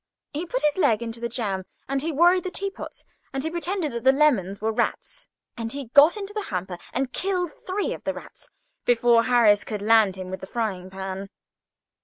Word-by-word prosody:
He 320 +5 -3
put 265 -3 -2
his 300 +2 +2
leg 235 - +3
into 230 0 -5
the 235 0 -3
jam, 200 -6 -2 0.2
and 275 0 -1
he 325 +3 -1
worried 350 +4 +4
the 370 - -3
teaspoons, 395 +1 -6 0.3
and 270 0 -2
he 320 - -2
pretended 345 -1 -2
that 235 -1 -5
the 260 - +7
lemons 245 -10 +2
were 220 +1 0
rats, - - -2 0.3
and 230 -2 -4 0.2
got 300 +8 +7
into 405 0 -5
the 425 - -2
hamper 180 -2 -4
and 260 0 -2
killed 360 -3 -1 0.2
three 390 +2 -1
of - - -9
them - - -2 0.7
before 235 -1 +4
Harris 225 -5 +5
could 210 -2 -5
land 215 -3 +5
him 185 -1 -7
with 190 - -4
the 190 - -8
frying 195 -5 -3
pan. 190 +1 -6
240 Hz, 195 wpm, -25 LUFS, 205-320 Hz, 0.7 s, the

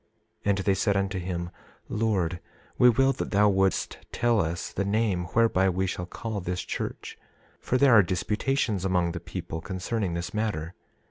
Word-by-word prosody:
27:3 - - -42 0.4
And 100 -1 +3
they 100 0 +2
said 100 +1 +1
unto 100 -1 -1
him: 85 -1 -4 0.4
Lord, 95 -6 0 0.4
we 125 - +8
will 135 +3 +3
that 135 - -4
thou 105 0 +4
wouldst 95 -1 +1
tell 120 -3 +2
us 85 +1 -3
the 100 - -1
name 100 -3 0
whereby 110 -5 +4
we 95 +1 0
shall 90 -1 -4
call 110 +3 -4
this 90 -1 -3
church; - - -5 0.4
for 130 - 0
there 140 -2 +5
are 110 - +9
disputations 105 - -1
among 90 -3 +1
the 85 - -5
people 85 -2 -6
concerning 95 +1 -2
this 85 0 -4
matter. 100 -6 -2
95 Hz, 175 wpm, -27 LUFS, 90-110 Hz, 0.4 s, are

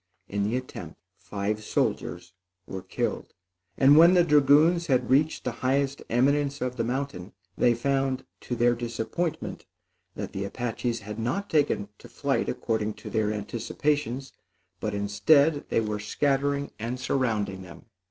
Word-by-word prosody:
In 100 0 -2
the 105 +5 0
attempt, 90 -11 -8 0.2
five 105 +1 -3
soldiers 90 -3 -2 0.3
were 95 - -6
killed; 95 - -3 0.4
and 135 +2 +7
when 170 +4 +8
the 175 - +6
dragoons 155 +3 +4
had 130 -3 +1
reached 150 +4 +3
the 125 - -1
highest 135 +1 +1
eminence 140 +3 +2
of 125 0 -2
the 115 - -1
mountain, 120 -6 -4 0.2
they 120 -1 +3
found, 135 +1 0
to 125 - -4
their 120 +1 +3
disappointment, 120 +8 -3 0.5
that - - -6
the 95 - -3
Apaches 115 +2 -3
had 105 +2 -7
not 130 - -2
taken 145 -9 +2
to - - -13
flight - - -1
according 110 -1 -1
to 110 - -9
their 110 -2 +1
anticipations, 125 +5 -2 0.5
but 105 -1 -2
instead, 140 +10 +3
they - - +2
were 105 -1 -2
scattering 140 +5 0
and 120 +3 -3
surrounding 110 -7 -1
them. 95 +4 -12
125 Hz, 145 wpm, -27 LUFS, 105-140 Hz, 0.5 s, when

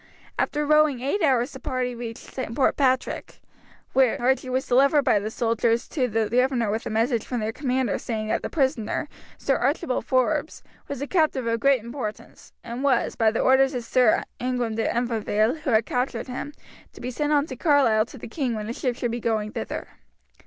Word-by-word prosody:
After 295 0 0
rowing 305 -4 +3
eight 285 +10 -1
hours 265 -4 +2
the 265 - -9
party 255 -1 -2
reached 235 -1 -8 0.2
Port 270 - +2
Patrick, 260 -2 0 0.5
where 260 -3 +3
Archie 255 +1 +1
was 260 +1 0
delivered 275 +4 +4
by 210 - +3
the 210 +2 -4
soldiers 230 0 0
to 260 -6 0
the 225 -1 0
governor 245 -2 +1
with 220 +2 -3
a - - -3
message 225 +1 +1
from 245 - -3
their 215 0 -2
commander 255 -3 -1
saying 215 -2 -3
that - - 0
the - - -4
prisoner, 265 -1 0 0.3
Sir 270 - +1
Archibald 270 0 -1
Forbes, 280 +4 0 0.2
was 280 -1 -4
a - - -4
captive 310 -8 +1
of 230 0 0
great 270 -2 +3
importance, 235 -3 -7
and 240 +3 -5
was, 280 -2 +2
by 225 -1 +3
the 220 - -1
orders 265 +1 +4
of 245 - -3
Sir 245 -2 +3 0.2
Ingram 245 -2 -1
de 225 0 -1
Umfraville 230 +1 0
who 295 - -3
had 220 -2 +3
captured 250 +1 -2
him, 260 +3 -5 0.4
to - - -13
be 250 +1 -4
sent 295 +4 -1
on 290 -1 +3
to 260 - -7
Carlisle 245 -7 +3
to 265 - -12
the - - -8
king 245 -1 -2
when 215 -1 -4
a 230 - -3
ship 250 -1 -2
should 240 -1 -2
be 240 - -3
going 215 -2 -1
thither. - - -5
250 Hz, 200 wpm, -25 LUFS, 230-270 Hz, 0.5 s, delivered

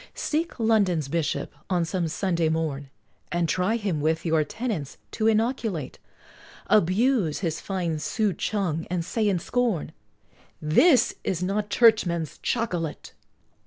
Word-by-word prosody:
Seek 320 -2 -2
London's 200 - +2
Bishop, 165 0 -2 0.2
on 175 -3 +1
some 175 0 -1
Sunday 170 -1 0
morn, 155 -4 -2 0.4
And 175 -1 +1
try 185 +6 +1
him 195 -9 -2
with 160 +3 0
your 160 -2 +3
tenets 190 - -4
to 220 - 0
inoculate, 220 - 0 0.7
Abuse 210 - +2
his 165 -4 -2
fine 175 -5 -2
souchong, 195 -3 -1
and 175 -2 -2
say 215 +3 0
in 190 - +1
scorn, 230 -1 -1 0.7
"This 235 - +4
is 180 -1 -1
not 205 +3 -1
Churchman's 175 - +3
Chocolate!" 175 -10 -2
180 Hz, 125 wpm, -25 LUFS, 160-220 Hz, 0.7 s, This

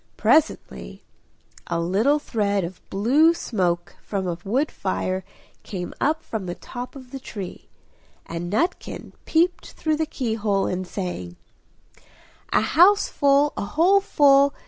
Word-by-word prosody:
Presently 60 -1 +1 0.6
a 170 -1 -1
little 205 - +2
thread 205 -8 -1
of 175 +2 -7
blue 280 +12 +4
smoke 180 - -2
from 195 -2 -3
a 170 -1 -3
wood 265 +9 0
fire 185 0 -2 0.4
came 180 -3 -6
up 315 +3 +1
from 210 -5 -5
the 175 - -4
top 245 +2 -8
of 255 -2 -12
the 270 - -6
tree, 200 -7 -8 0.6
and 170 +1 -5
Nutkin 340 - -2
peeped 350 +3 +1
through 310 -1 -1
the 315 0 -1
key 245 -7 -2
hole 205 -3 0
and 185 0 -3
sang 175 - -5 1.2
"A - - +4
house 360 - +5
full, 285 0 +3
a - - -3
hole 340 - +3
full! 280 -5 +4
220 Hz, 140 wpm, -23 LUFS, 185-295 Hz, 1.2 s, house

